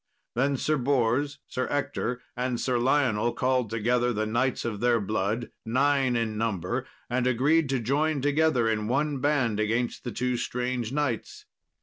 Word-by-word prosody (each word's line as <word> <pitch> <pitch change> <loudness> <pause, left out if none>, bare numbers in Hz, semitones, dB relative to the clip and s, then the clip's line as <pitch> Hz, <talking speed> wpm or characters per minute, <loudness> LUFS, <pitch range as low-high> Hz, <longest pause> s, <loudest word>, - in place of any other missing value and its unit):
Then 135 +3 +1
Sir 155 +3 +1
Bors, 135 +1 +1
Sir 130 - -2
Ector, 125 -3 -2
and 125 -1 -1
Sir 125 -2 0
Lionel 120 -3 +2
called 125 -1 +1
together 120 +3 +1
the 110 -1 -1
knights 120 +4 0
of 110 -3 -3
their 120 0 +3
blood, 105 +3 -2
nine 135 +1 +2
in 110 -2 -1
number, 115 +3 -2 0.2
and 125 0 0
agreed 140 +5 +3
to 135 -1 +1
join 145 +6 +1
together 145 -3 +2
in 105 -1 0
one 140 +3 0
band 130 -6 +1
against 115 +3 -1
the 120 - -4
two 125 0 -1
strange 125 -1 -2
knights. 135 -6 -2
125 Hz, 155 wpm, -27 LUFS, 115-135 Hz, 0.2 s, their